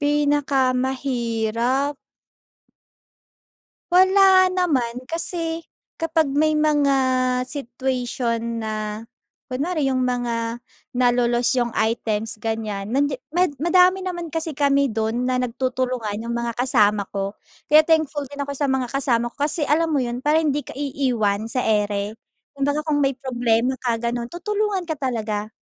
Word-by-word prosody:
Pinakamahirap? 265 -3 0 2.0
Wala 375 0 +6
naman 265 -10 0
kasi 330 +2 -3 0.4
kapag 325 0 +2
may 310 +2 +2
mga 295 -2 +3 0.5
situation 250 -2 -2 0.2
na 215 -1 -4 0.5
kunwari, 300 +3 -1
yung 255 - 0
mga 240 -1 -2 0.3
nalo-lost 245 -1 +2
yung 240 - +1
items 220 -1 -1
ganyan, 215 -3 -3
nandiya 270 +2 0 0.2
mad 360 -3 +3
madami 365 +3 +4
naman 345 -4 -5
kasi 320 -3 -3
kami 280 -1 +3
dun 225 +2 -1
na 255 - +1
nagtutulungan, 250 -3 -2
yung 235 - -3
mga 235 -1 -3
kasama 210 -5 +3
ko. 195 +1 -3 0.3
Kaya 305 +1 +7
thankful 315 -3 +1
din 285 - -7
ako 280 0 -3
sa 290 - -1
mga 265 -2 0
kasama 240 -3 0
ko 235 - -23
kasi 305 +3 -1
alam 320 +2 +2
mo 285 - +2
yun, 245 0 -3
para 305 +2 +4
hindi 295 -2 0
ka - - -9
iiwan 250 -7 -1
sa 255 - 0
ere? 210 -1 0 0.4
Kumbaga 285 +2 0
kung 300 - +2
may 275 - +2
problema 250 -1 0
ka, 235 -3 -1
ganun. 235 0 -2
Tutulungan 405 0 -2
ka 315 - -2
talaga. 220 -6 -2
255 Hz, 130 wpm, -22 LUFS, 235-295 Hz, 2.0 s, Kaya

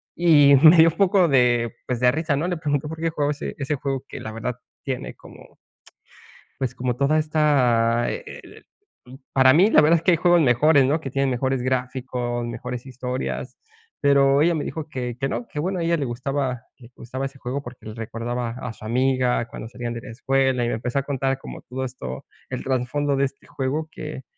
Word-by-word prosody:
y 150 -5 +6
me 155 +5 +8
dio 165 +1 +8
un 160 - -8
poco 195 -2 +4
de 120 -3 +3
pues, 125 -2 -2
de 125 0 +5
risa, 155 +1 -1
¿no?, 155 +5 -1
le 175 - -2
pregunto 145 -2 -1
por 160 0 -7
qué 165 0 -1
jugaba 145 -2 0
ese 145 - -5
ese 140 +1 -1
juego 135 -1 -3
que - - -7
la 110 - -7
verdad 115 +2 -4 0.3
tiene 130 -3 -4
como, - - -16 1.0
pues, 125 -2 -2
como 125 -2 -2
toda 140 +4 +2
esta, 125 -7 +2
e - - -5
e - - -9 0.2
e - - -21 0.7
para 130 -1 +6
mí 190 +7 +5
la - - +7
verdad 160 +3 +5
es - - -9
que - - +5
hay - - +4
juegos 175 0 +4
mejores 140 +2 +4
¿no?, 150 +4 +1
que 135 - -6
tienen 135 +1 0
mejores 130 +1 -1
gráficos, 125 -1 -2
mejores 120 +1 -6
historias. 130 0 -4 0.5
Pero, 140 -1 +4
ella 170 +2 +3
me 150 - -2
dijo 160 -1 -5
que 125 -5 -4
que 135 - -1
no, 240 - -4
que 150 - -7
bueno, 185 +4 -2
a - - -1
ella 170 0 +2
le 145 - -2
gustaba 130 +1 -3 0.2
le 120 -1 -15
gustaba 130 +3 -5
ese 135 0 -10
juego, 130 +3 -4
porque, 120 -3 -12
le 110 - -7
recordaba 115 +2 -4
a 125 0 -6
su 110 - -14
amiga 125 +1 +1
cuando 110 - -8
salían 120 -1 -5
de 115 - -7
la - - -10
escuela 130 +1 +1
y - - -1
me - - -1
empezó 120 +4 -2
a - - -5
contar 135 -1 -1
como - - -9
todo 130 +1 -5
esto, 65 - -7 0.3
el - - -4
trasfondo 135 +2 0
de 135 - +2
este 135 +1 -11
juego, 145 +4 -3
que 150 -5 -7
135 Hz, 215 wpm, -23 LUFS, 125-150 Hz, 1.0 s, me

